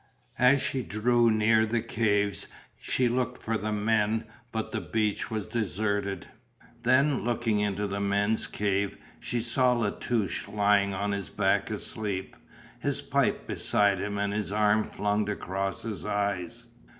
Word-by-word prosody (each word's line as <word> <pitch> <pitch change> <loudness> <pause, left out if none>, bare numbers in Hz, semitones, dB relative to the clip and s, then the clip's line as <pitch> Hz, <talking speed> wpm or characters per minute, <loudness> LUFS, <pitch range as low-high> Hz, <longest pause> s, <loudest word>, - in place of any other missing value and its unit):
As 130 +2 +5
she 130 - -1
drew 120 +1 +2
near 110 0 +4
the 110 +1 0
caves 105 -3 0 0.3
she 125 - +1
looked 125 +1 -1
for 115 - -2
the 110 0 -2
men, 110 +1 +1 0.3
but 110 -1 -3
the 110 - -2
beach 105 +4 -1
was 110 -3 -3
deserted. 100 -3 -2 0.5
Then, 130 +3 +3
looking 115 -3 0
into 105 0 0
the 100 0 -3
men's 100 +2 +1
cave, 100 -1 -1 0.2
she 120 - -2
saw 125 +2 +2
La 115 -4 0
Touche 110 -7 -2
lying 100 -1 +2
on 100 +2 -1
his 100 -6 -3
back - - +1
asleep, 100 -4 -4 0.4
his - - -1
pipe - - +1
beside 100 -2 +2
him 100 +1 -3
and 100 0 0
his 105 -1 -2
arm 105 0 +3
flung 105 0 -1
across 95 -1 -3
his 110 -3 -5
eyes. 100 -4 -2
105 Hz, 150 wpm, -28 LUFS, 100-115 Hz, 0.5 s, As